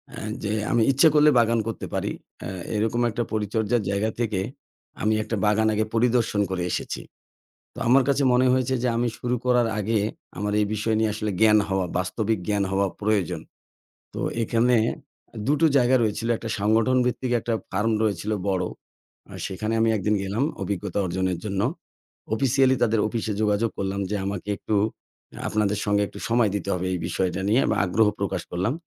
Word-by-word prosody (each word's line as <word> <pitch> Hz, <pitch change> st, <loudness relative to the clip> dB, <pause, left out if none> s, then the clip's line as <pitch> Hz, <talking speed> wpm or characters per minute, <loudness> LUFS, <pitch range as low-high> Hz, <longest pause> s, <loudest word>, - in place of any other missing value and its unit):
আ -, -, -7 dB, 0.2 s
যে 105 Hz, -, -1 dB, 0.2 s
আমি 120 Hz, -, +3 dB
ইচ্ছে 140 Hz, +5 st, +5 dB
করলে 150 Hz, 0 st, +6 dB
বাগান 115 Hz, 0 st, +3 dB
করতে 115 Hz, -, -4 dB
পারি -, -, -1 dB, 0.3 s
আ -, -, -4 dB, 0.3 s
এরকম 110 Hz, +3 st, 0 dB
একটা 120 Hz, +1 st, -2 dB
পরিচর্যার 110 Hz, +2 st, 0 dB
জায়গা 100 Hz, +2 st, 0 dB
থেকে 105 Hz, -5 st, 0 dB, 0.6 s
আমি 110 Hz, +1 st, +2 dB
একটা 110 Hz, +1 st, -3 dB
বাগান 110 Hz, +1 st, +3 dB
আগে 110 Hz, +1 st, +1 dB
পরিদর্শন 115 Hz, -3 st, +2 dB
করে 90 Hz, -2 st, -1 dB
এসেছি। -, -, -3 dB, 0.7 s
তো -, -, -13 dB
আমার 135 Hz, +2 st, +6 dB
কাছে 140 Hz, 0 st, +2 dB
মনে 125 Hz, +1 st, +4 dB
হয়েছে 130 Hz, 0 st, +1 dB
যে 125 Hz, -, +1 dB
আমি 120 Hz, +1 st, +1 dB
শুরু 125 Hz, 0 st, -1 dB
করার 125 Hz, -1 st, +3 dB
আগে 110 Hz, +2 st, +1 dB, 0.4 s
আমার 105 Hz, +1 st, -1 dB
এই 105 Hz, -, +2 dB
বিষয় 110 Hz, +1 st, 0 dB
নিয়ে 110 Hz, -1 st, +2 dB
আসলে 105 Hz, 0 st, -2 dB
জ্ঞান 105 Hz, -1 st, +6 dB
হওয়া 95 Hz, -1 st, 0 dB
বাস্তবিক 105 Hz, +3 st, -1 dB
জ্ঞান 105 Hz, -1 st, +1 dB
হওয়া 100 Hz, +1 st, +2 dB
প্রয়োজন। 105 Hz, -5 st, 0 dB, 0.7 s
তো -, -, -5 dB, 0.2 s
এখানে 120 Hz, +2 st, +2 dB, 0.6 s
আ -, -, -7 dB
দুটো 150 Hz, +3 st, +3 dB
জায়গা 125 Hz, 0 st, +4 dB
রয়েছিল, 110 Hz, +1 st, -1 dB
একটা 115 Hz, -, -6 dB
সংগঠন 110 Hz, +5 st, +3 dB
ভিত্তিক 125 Hz, 0 st, -1 dB
একটা 115 Hz, +1 st, -2 dB, 0.2 s
ফার্ম 105 Hz, +4 st, +1 dB
রয়েছিল 105 Hz, 0 st, -1 dB, 0.2 s
বড়। 95 Hz, -2 st, +1 dB, 0.7 s
আর -, -, -8 dB
সেখানে 110 Hz, +4 st, -3 dB
আমি 115 Hz, -, +3 dB
১ 105 Hz, -, -2 dB
দিন 105 Hz, -, +3 dB
গেলাম 100 Hz, +7 st, -1 dB, 0.2 s
অভিজ্ঞতা 100 Hz, 0 st, -3 dB
অর্জনের 95 Hz, 0 st, -1 dB
জন্য। 100 Hz, -2 st, -1 dB, 0.7 s
অফিসিয়ালি 130 Hz, +2 st, +3 dB
তাদের 110 Hz, 0 st, +2 dB
অফিসে 110 Hz, -1 st, -2 dB
যোগাযোগ 105 Hz, +2 st, +2 dB
করলাম 95 Hz, 0 st, -2 dB
যে, 105 Hz, -, -1 dB
"আমাকে 100 Hz, 0 st, -4 dB
একটু 110 Hz, -, -2 dB, 0.6 s
অ্যা -, -, -9 dB
আপনাদের 105 Hz, -1 st, 0 dB
সঙ্গে 105 Hz, 0 st, +2 dB
একটু -, -, -11 dB
সময় 115 Hz, -2 st, +3 dB
দিতে 100 Hz, -, -3 dB
হবে 90 Hz, 0 st, -2 dB
এই -, -, 0 dB
বিষয়টা 95 Hz, +1 st, -1 dB
নিয়ে।" 110 Hz, +6 st, +4 dB
এবং -, -, +1 dB
আগ্রহ 105 Hz, +4 st, +3 dB
প্রকাশ 100 Hz, -1 st, -1 dB
করলাম। 95 Hz, +8 st, 0 dB
110 Hz, 180 wpm, -24 LUFS, 100-120 Hz, 0.7 s, করলে